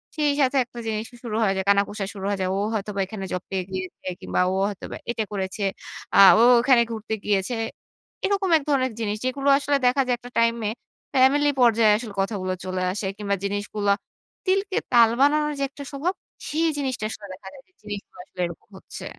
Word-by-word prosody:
সেই 295 -2 +2
সাথে 270 0 +2
একটা 240 - -11
জিনিস 215 0 -2 0.2
শুরু 225 -3 -4
হয়ে 195 -2 +2
যায়। 190 - -2
কানাঘুষা 200 0 +2
শুরু 195 -2 -6
হয়ে 200 -1 -1
যায়। 185 - 0
ও - - 0
হয়তোবা 205 -1 -3
এখানে 195 0 -6
জব 180 0 -3
পেয়ে 190 -1 -1
গিয়েছে 185 0 -6
কিংবা - - 0
ও - - -1
হয়তোবা 200 - -7
এটা 225 -2 -2
করেছে, 190 +1 -3 0.5
আ - - +6 0.2
ও - - +6 0.2
ওখানে 250 -1 +5
ঘুরতে 220 0 -4
গিয়েছে। 205 +3 0 0.7
এরকম 395 -1 +1
এক 305 - -5
ধরনের 260 -4 +1
জিনিস 210 -2 -1
যেগুলো 275 +2 0
আসলে 285 0 +1
দেখা 265 +3 +3
যায় 245 - +2
একটা 245 +1 -12
টাইম 230 0 +3
এ - - -2 0.4
ফ্যামিলি 280 +3 +5
পর্যায়ে 230 -2 +5
আসলে 220 -2 -7
কথাগুলো 195 -2 -2
চলে 185 0 -2
আসে 195 +1 -3
কিংবা 200 -1 -1
জিনিসগুলো 205 0 -1 0.5
তিলকে 390 +1 +1 0.2
তাল 230 -2 +7
বানানোর 300 +1 +3
যে, - - 0
একটা 280 +1 -10
স্বভাব, 305 +6 -1 0.4
সেই 325 +2 +1
জিনিসটা 260 -6 -2
আসলে 210 - -8
দেখা 190 +1 -12
যায় 270 - -13
যে, - - -35
জিনিসগুলো 205 -3 -8
আসলে 185 - -19
এরকম 170 +3 -12
হচ্ছে। - - -10
220 Hz, 195 wpm, -24 LUFS, 200-275 Hz, 0.7 s, তাল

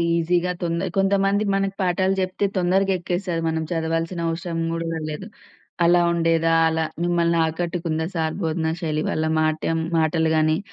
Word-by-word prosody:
ఈజీగా 175 +2 +1
తొంద 170 +2 -1
కొంతమంది 195 +1 +2
మనకు 195 0 -1
పాఠాలు 185 +1 +1
జెప్తే 185 +2 -1
తొందరగా 190 +2 +2
ఎక్కేస్తది. 175 -1 -2
మనం 160 0 -1
చదవాల్సిన 165 +1 -1
అవసరం 165 0 -3
గూడా 165 -1 -3
లేదు. 155 +6 -6 0.6
అలా 175 +1 +5
ఉండేదా? 165 -1 +2 0.2
అలా 160 0 0 0.2
మిమ్మల్ని 170 -1 +2
ఆకట్టుకుందా 165 -1 -2
సార్ 160 -1 -1
భోధనా 160 0 0
శైలి? 155 -2 -1
వాళ్ళ 155 - -1
మాటెం 155 +1 0 0.2
మాటలు 160 0 +2
గానీ, 155 0 +3
170 Hz, 140 wpm, -23 LUFS, 160-180 Hz, 0.6 s, అలా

